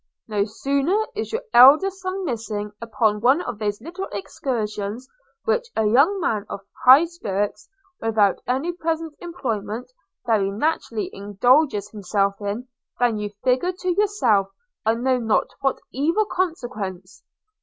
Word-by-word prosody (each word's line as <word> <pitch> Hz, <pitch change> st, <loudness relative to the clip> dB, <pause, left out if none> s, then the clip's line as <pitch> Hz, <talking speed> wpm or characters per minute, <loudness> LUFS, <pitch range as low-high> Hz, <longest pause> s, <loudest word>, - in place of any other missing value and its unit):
No 205 Hz, -2 st, 0 dB
sooner 275 Hz, -, 0 dB, 0.2 s
is -, -, -4 dB
your 455 Hz, +2 st, -2 dB
elder 285 Hz, +10 st, +8 dB
son 380 Hz, 0 st, -5 dB
missing 215 Hz, -6 st, -3 dB
upon 220 Hz, -2 st, 0 dB
one 260 Hz, +7 st, +4 dB
of 245 Hz, -11 st, -5 dB
those 205 Hz, -1 st, -2 dB
little 355 Hz, +5 st, -6 dB
excursions, 210 Hz, +1 st, -4 dB, 0.4 s
which 470 Hz, +1 st, +1 dB
a 220 Hz, -, +1 dB
young 280 Hz, -, +4 dB
man 220 Hz, -, 0 dB
of 200 Hz, -, -5 dB, 0.2 s
high 265 Hz, +6 st, +8 dB
spirits, 210 Hz, -, -3 dB, 0.3 s
without 215 Hz, -3 st, +2 dB
any 270 Hz, +7 st, 0 dB
present 325 Hz, -2 st, -3 dB
employment, 240 Hz, -, -4 dB, 0.3 s
very 215 Hz, -4 st, +2 dB
naturally 230 Hz, -1 st, -2 dB
indulges 205 Hz, +2 st, +2 dB
himself 200 Hz, -1 st, -1 dB
in, 205 Hz, +5 st, -4 dB, 0.3 s
than 240 Hz, -3 st, +2 dB
you 210 Hz, 0 st, -3 dB
figure 260 Hz, +9 st, +2 dB
to 365 Hz, 0 st, -4 dB
yourself 340 Hz, -, +2 dB, 0.4 s
I 225 Hz, -, +4 dB
know 255 Hz, +2 st, +1 dB
not 225 Hz, -2 st, +1 dB
what 270 Hz, -1 st, 0 dB
evil 330 Hz, -, +1 dB
consequence. 230 Hz, -, -4 dB
245 Hz, 135 wpm, -23 LUFS, 210-325 Hz, 0.4 s, elder